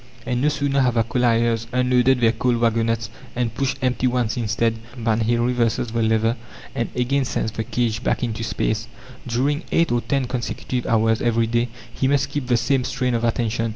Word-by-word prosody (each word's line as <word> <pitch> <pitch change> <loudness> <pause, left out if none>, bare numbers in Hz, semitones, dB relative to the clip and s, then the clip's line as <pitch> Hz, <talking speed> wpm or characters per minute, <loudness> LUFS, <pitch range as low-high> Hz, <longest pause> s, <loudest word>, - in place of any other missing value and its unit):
And 125 -1 -1
no 150 - +3
sooner 140 -1 +1
have 125 -2 +2
the 115 - +3
colliers 115 -1 +1
unloaded 125 0 +3
their 115 -1 +5
coal 125 +1 0
wagonettes, 115 -1 +1 0.3
and 120 -2 -1
pushed 135 +2 -1
empty 130 0 +1
ones 120 -3 0
instead, 115 -1 0 0.2
than 115 -1 0
he 115 +2 +1
reverses 120 -1 +1
the 115 0 0
lever 110 +1 +2 0.4
and - - -2
again 135 +3 +1
sends 110 -3 -2
the 110 0 -3
cage 120 0 -1
back - - 0
into 115 -1 -2
space. 110 0 -1 0.4
During 135 +6 0
eight 165 -4 +2
or 120 0 +2
ten 135 0 0
consecutive 125 0 -3
hours 110 0 +2
every 115 -1 +2
day 120 +1 0 0.3
he 130 - 0
must 140 0 +2
keep 145 -3 -3
the 120 -1 +3
same 130 +3 +1
strain 125 0 -1
of 115 0 0
attention. 115 -1 0
120 Hz, 190 wpm, -22 LUFS, 115-125 Hz, 0.4 s, their